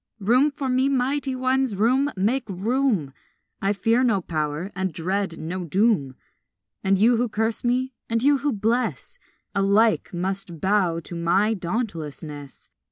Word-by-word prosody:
Room 240 +8 +3
for 280 -2 -5
me, 260 +1 +2
mighty 270 +1 0
ones, 260 -2 +1
room, 255 +8 +2
make 225 +6 0
room! 205 - 0 0.5
I 195 - +1
fear 225 +5 +2
no 225 -6 +3
power 155 +1 -3
and 190 -1 -1
dread 185 +2 -2
no 180 +4 -4
doom; 175 - +1 0.7
And 195 0 +3
you 230 +4 +4
who 240 0 0
curse 220 +1 -1
me 255 +2 0 0.2
and 230 +1 0
you 285 0 +4
who 290 +2 0
bless 240 - -1 0.3
Alike 205 +3 +2
must 185 -1 -3
bow 185 -3 +1
to 175 - -9
my 185 +6 +2
dauntlessness. 160 - -5
210 Hz, 145 wpm, -24 LUFS, 180-250 Hz, 0.7 s, you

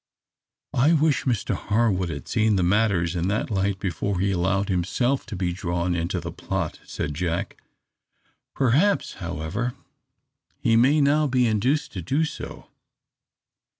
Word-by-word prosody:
"I 145 +7 +4
wish 155 -3 +2
Mr 120 -6 0
Harwood 105 -5 +1
had 70 -5 -6
seen 110 -1 +2
matters 95 -4 +2
in 85 +1 0
that 105 +3 -1
light 100 -1 0
before 95 +1 -2
he 100 +1 +1
allowed 95 +2 +1
himself 120 +9 0
to 110 - -5
be 90 -2 -1
drawn 85 0 -1
into 85 +2 -1
the 85 0 -6
plot!" 95 -4 -3
said 75 - -4
Jack. 85 +2 -3 0.9
"Perhaps, 140 - +2
however, 85 +8 -3 0.8
he 115 - +2
may 135 +6 +4
now 150 +2 +3
be 125 -2 +2
induced 125 +8 +1
to 95 - -4
do 140 - +1
so. - - -8
100 Hz, 140 wpm, -24 LUFS, 90-125 Hz, 0.9 s, I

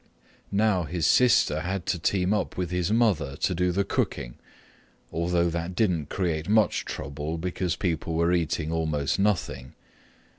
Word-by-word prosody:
Now 100 -3 +2
his 85 -1 -2
sister 120 - +4
had 90 +2 -3
to 90 -2 -1
team 95 +3 +1
up 105 - -2
with 90 -2 -2
his 90 +2 0
mother 100 - +2
to 90 - 0
do 90 +1 +1
the 100 +3 +1
cooking, - - -2 0.7
although 85 +1 +1
that 85 +2 -4
didn't 90 -8 0
create 85 -3 -2
much 110 0 +3
trouble 75 +3 -5
because 90 +1 -2
people 80 -3 -2
were 85 +2 +2
eating 80 -2 0
almost 80 -2 -1
nothing. 85 -11 -1
85 Hz, 150 wpm, -26 LUFS, 80-95 Hz, 0.7 s, sister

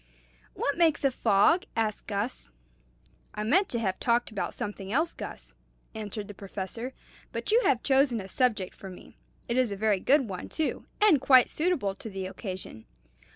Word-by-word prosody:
"What 285 +4 -1
makes 325 -4 +3
a 275 - +4
fog?" 245 - +3
asked 220 -2 -1
Gus. 205 - -3 0.9
"I 210 - -2
meant 355 - +3
to 235 - -2
have 190 -5 -1
talked 240 0 +1
about 200 - -3
something 200 -1 -5
else, 320 +7 +1
Gus," - - -8 0.4
answered 210 -1 -6
the 205 - -8
Professor; 200 +6 -6 0.4
"but - - -3
you 465 +3 +5
have 245 -3 +2
chosen 265 -3 +3
a 190 - -7
subject 210 -3 0
for 195 - -9
me. 180 - -13 0.3
It 235 - -1
is 255 -4 +2
a - - -2
very 210 -1 +2
good 270 +4 +3
one, 185 -3 -6
too, 315 - -2
and 390 -11 +5
quite 260 -2 +6
suitable 305 - 0
to 220 - -9
the 190 -2 -5
occasion. 185 - -7
225 Hz, 175 wpm, -28 LUFS, 195-270 Hz, 0.9 s, quite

